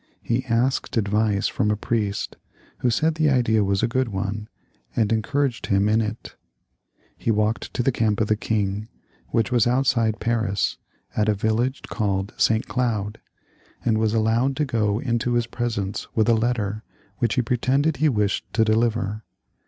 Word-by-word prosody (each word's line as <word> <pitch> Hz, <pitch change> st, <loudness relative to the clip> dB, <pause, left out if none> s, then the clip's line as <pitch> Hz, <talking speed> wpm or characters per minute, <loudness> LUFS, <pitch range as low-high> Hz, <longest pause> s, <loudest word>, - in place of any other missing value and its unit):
He 120 Hz, +2 st, 0 dB
asked 120 Hz, +2 st, 0 dB
advice 105 Hz, -1 st, +1 dB
from 105 Hz, -, 0 dB
a 105 Hz, -, +2 dB
priest, 105 Hz, -2 st, -2 dB, 0.4 s
who 125 Hz, -, +2 dB
said 155 Hz, +7 st, +2 dB
the 155 Hz, -1 st, +2 dB
idea 115 Hz, -5 st, +3 dB
was 100 Hz, +1 st, 0 dB
a -, -, +4 dB
good 130 Hz, +2 st, 0 dB
one, 105 Hz, +1 st, -3 dB, 0.5 s
and 110 Hz, -1 st, +2 dB
encouraged 130 Hz, +2 st, 0 dB
him 100 Hz, +1 st, +2 dB
in 110 Hz, +1 st, +3 dB
it. 110 Hz, 0 st, -5 dB, 0.8 s
He -, -, -4 dB
walked 110 Hz, +1 st, 0 dB
to 125 Hz, -, +1 dB
the 135 Hz, -, +3 dB
camp 110 Hz, -4 st, +1 dB
of 110 Hz, -, +1 dB
the 110 Hz, -, +3 dB
king, 105 Hz, -1 st, -1 dB, 0.4 s
which 115 Hz, +1 st, 0 dB
was 120 Hz, -2 st, +3 dB
outside 120 Hz, -3 st, +2 dB
Paris, 110 Hz, -4 st, 0 dB, 0.4 s
at 105 Hz, 0 st, +2 dB
a 105 Hz, -, +3 dB
village 110 Hz, +6 st, 0 dB, 0.2 s
named 100 Hz, -1 st, 0 dB
St. 110 Hz, 0 st, +2 dB
Cloud, 110 Hz, -4 st, -1 dB, 0.7 s
and 110 Hz, -2 st, +2 dB
was 110 Hz, 0 st, +1 dB
allowed 115 Hz, +5 st, +2 dB
to 150 Hz, -, 0 dB
go 110 Hz, -5 st, 0 dB
into 120 Hz, 0 st, -1 dB
his 120 Hz, -1 st, +2 dB
presence 115 Hz, -5 st, -3 dB
with 110 Hz, 0 st, +3 dB
a 115 Hz, -, +5 dB
letter 110 Hz, -2 st, 0 dB, 0.4 s
which 115 Hz, 0 st, +1 dB
he 125 Hz, -, +2 dB
pretended 135 Hz, +5 st, +1 dB
he 155 Hz, +3 st, +3 dB
wished 105 Hz, -5 st, -1 dB
to 110 Hz, 0 st, +3 dB
deliver. 110 Hz, -1 st, 0 dB
110 Hz, 170 wpm, -23 LUFS, 105-120 Hz, 0.8 s, a